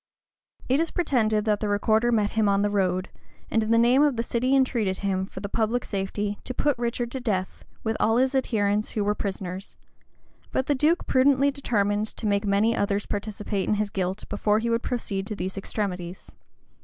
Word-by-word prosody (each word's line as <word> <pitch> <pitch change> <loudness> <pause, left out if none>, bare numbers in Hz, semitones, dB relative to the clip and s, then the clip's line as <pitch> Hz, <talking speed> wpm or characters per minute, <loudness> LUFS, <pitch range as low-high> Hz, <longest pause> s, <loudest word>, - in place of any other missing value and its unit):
It 265 +3 +3
is 330 0 +1
pretended 225 -10 +1
that 210 -2 +2
the 210 - -2
recorder 220 +3 +2
met 210 -3 +2
him 220 -2 +2
on 200 0 +2
the 205 - +1
road, 185 -2 0 0.4
and 225 - +3
in 215 - -2
the 230 - +4
name 240 +4 +5
of 295 -3 +3
the 230 - -1
city 250 +3 +1
entreated 235 -8 +1
him, 190 -1 0
for 190 - -9
the 200 - -3
public 225 +4 0
safety, 205 +1 -3
to 255 - -5
put 290 -2 +2
Richard 240 0 -2
to 265 - -4
death, 195 -7 -2 0.2
with 220 0 -1
all 225 +1 +3
his 260 +2 +2
adherents 210 -5 0
who 210 - 0
were 205 +1 +2
prisoners; 190 -2 -5 0.7
but 260 - 0
the 290 - +2
duke 305 +6 +2
prudently 275 +1 +4
determined 210 -6 0
to 220 - -7
make 205 0 +1
many 210 +4 +3
others 200 0 0
participate 205 -1 -3
in 215 - +3
his 210 -1 -1
guilt, 185 0 -2
before 210 0 +1
he 230 +1 -1
would 230 0 +1
proceed 200 -7 -3
to 215 - -4
these 185 0 -4
extremities. 185 -3 -4
215 Hz, 200 wpm, -25 LUFS, 200-240 Hz, 0.7 s, name